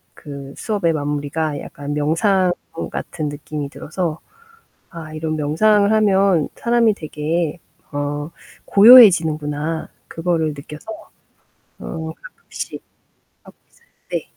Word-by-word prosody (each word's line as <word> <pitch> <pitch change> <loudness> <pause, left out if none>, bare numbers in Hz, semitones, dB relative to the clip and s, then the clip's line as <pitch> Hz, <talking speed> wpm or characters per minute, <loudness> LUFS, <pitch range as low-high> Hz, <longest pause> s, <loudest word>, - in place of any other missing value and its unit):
그 140 -1 -9
수업의 200 -7 0
마무리가 145 +1 -2
약간 145 +1 -7
명상 180 +6 +2 0.4
같은 155 -3 -4
느낌이 145 0 -6
들어서 160 +2 -4 0.7
'아 160 -3 -9
이런 155 0 -3
명상을 200 +8 +3
하면 195 -6 +3
사람이 235 -2 +2
되게 160 0 -3 0.3
어 145 +1 -3 0.4
고요해지는구나.' 165 -9 +6 0.2
그거를 165 -1 -1
느껴서 150 +1 -11 0.9
어 160 -1 -6
가끔씩 - - -9 0.6
하고 - - -16
있어요. 470 - -30 0.2
네. - - -3
160 Hz, 240 characters per minute, -20 LUFS, 150-190 Hz, 0.9 s, 고요해지는구나